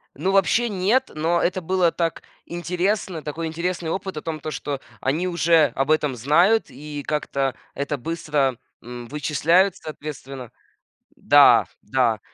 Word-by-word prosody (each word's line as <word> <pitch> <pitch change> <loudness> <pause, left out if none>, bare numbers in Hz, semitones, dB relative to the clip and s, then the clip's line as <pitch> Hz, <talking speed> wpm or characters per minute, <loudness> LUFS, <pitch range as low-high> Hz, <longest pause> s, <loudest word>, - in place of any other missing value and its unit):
Ну, 190 - -1
вообще 225 +5 +3
нет, 210 +7 +1
но 165 +3 +1
это 185 +1 0
было 180 0 +2
так 165 -2 -2 0.2
интересно, 175 0 -2
такой 160 +2 -4
интересный 170 +1 -3
опыт 190 0 -4
о - - -3
том, 160 -1 -4
то, 155 +2 -5
что 140 0 -4 0.2
они 155 +7 0
уже 165 -5 +3
об 135 +2 -1
этом 150 -4 +2
знают 170 - +3
и 145 +2 -8
как-то 140 -3 -1 0.2
это 140 +1 -3
быстро, 145 -3 -1 0.3
м, 120 0 -8
вычисляют 160 +6 +2
соответственно. 135 -5 -8 0.6
Да, - - +6 0.2
да. 115 -1 +1
155 Hz, 140 wpm, -23 LUFS, 140-180 Hz, 0.6 s, Да